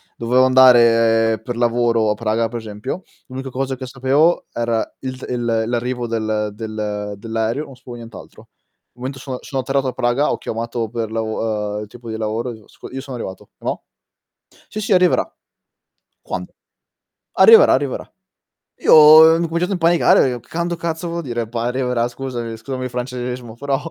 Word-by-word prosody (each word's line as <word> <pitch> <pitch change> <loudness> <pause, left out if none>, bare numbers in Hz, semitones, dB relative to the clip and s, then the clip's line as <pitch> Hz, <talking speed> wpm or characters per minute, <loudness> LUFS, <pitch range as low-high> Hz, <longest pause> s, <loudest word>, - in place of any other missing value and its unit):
Dovevo 125 +2 +3
andare 115 -4 +5
per 120 0 -5
lavoro 120 -2 +2
a - - +2
Praga, 110 +1 -1
per 120 +1 -5
esempio. 110 - -6 0.2
L'unica 130 +1 -6
cosa 135 +1 -3
che 130 0 -7
sapevo 135 +6 +2
era 115 -1 0 0.2
il 130 -1 -5
d - - -9
il 120 -2 0
l'arrivo 120 0 -2
del 110 -2 -2
del 105 -1 -4
dell'aereo, 115 +6 -2
non 135 - -13
sapevo 125 -1 -11
nient'altro. 115 -1 -12 0.5
Momento 130 +2 -6
sono 130 -1 -5
sono 135 -1 -3
atterrato 135 +1 -1
a 130 - -2
Praga, 120 +4 +1
ho - - -1
chiamato 115 0 -4
per 115 -1 -4
lav 110 -2 -2
ehm, - - -5
il - - -10
tipo 115 +2 -12
di 110 - -4
lavoro, 110 +3 -3
dico: 110 -2 -15 0.2
"Io 135 +1 -5
sono 130 -3 -7
arrivato, 95 -4 -8
e - - -15
mò?" - - -2 0.9
"Sì, 215 - -5
sì 210 0 -1
arriverà". 180 -1 +3 0.9
"Quando?" - - -6 0.8
"Arriverà, 455 +1 +7
arriverà." - - -1 0.8
Io, - - +6 0.3
ehm, 160 - +7
ho - - +2
incominciato 170 +3 -1
a - - +1
impanicare 165 -6 +4
e 120 - -7
che - - -26
quando 170 +1 -2
cazzo 170 0 -4
vuol 170 0 -4
dire 120 -5 -3
p 115 - -23
arriverà, 125 0 0
scusami 120 -3 -5
scusami 130 +3 -5
il 125 - -4
francesismo, 125 -1 -5
però 140 +1 -1
120 Hz, 175 wpm, -19 LUFS, 115-135 Hz, 0.9 s, Arriverà